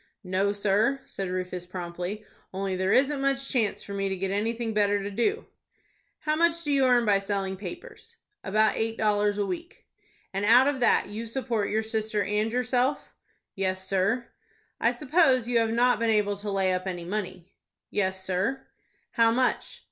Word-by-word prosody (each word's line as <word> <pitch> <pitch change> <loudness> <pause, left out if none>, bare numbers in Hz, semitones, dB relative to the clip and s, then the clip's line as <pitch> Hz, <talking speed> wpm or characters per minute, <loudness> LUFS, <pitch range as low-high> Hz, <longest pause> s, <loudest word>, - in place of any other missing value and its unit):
"No, 190 +2 +1
sir," 210 +7 +1
said 195 -2 -5
Rufus, 180 -1 -4
promptly. 180 +3 -5 0.3
"Only 190 0 -2
there 185 +1 0
isn't 275 +1 +3
much 275 0 0
chance 225 -6 0
for 200 - -8
me 195 0 -1
to 190 - -2
get 190 +1 -2
anything 225 +3 -1
better 205 -1 +2
to 200 - -4
do." 400 - 0 0.8
"How 305 0 0
much 335 +1 +2
do 295 -2 0
you 270 -1 +4
earn 245 -2 +4
by 200 -2 +4
selling 195 -1 -2
papers?" 450 - -9 0.3
"About 215 +2 +2
eight 225 0 -2
dollars 210 -1 +1
a 205 - 0
week." 345 - -6 0.5
"And 195 +1 -2
out 235 +5 +6
of 285 -1 0
that 240 - +3
you 220 +3 -5
support 230 -4 -2
your 220 +1 0
sister 220 -2 -1
and 210 +3 0
yourself?" 250 +3 0 0.4
"Yes, 190 -1 -2
sir." 200 +6 0 0.5
"I - - +3
suppose 270 -5 +2
you 240 -1 +2
have 225 -1 +1
not 245 +2 +3
been 230 0 +1
able 210 -2 +2
to 205 +1 -5
lay 190 -2 +1
up 185 +1 -3
any 175 -2 -4
money." 185 -2 -5 0.4
"Yes, 190 -2 -1
sir." 190 +9 -1 0.5
"How 230 -1 +4
much?" 255 - 0
210 Hz, 180 wpm, -27 LUFS, 195-250 Hz, 0.8 s, out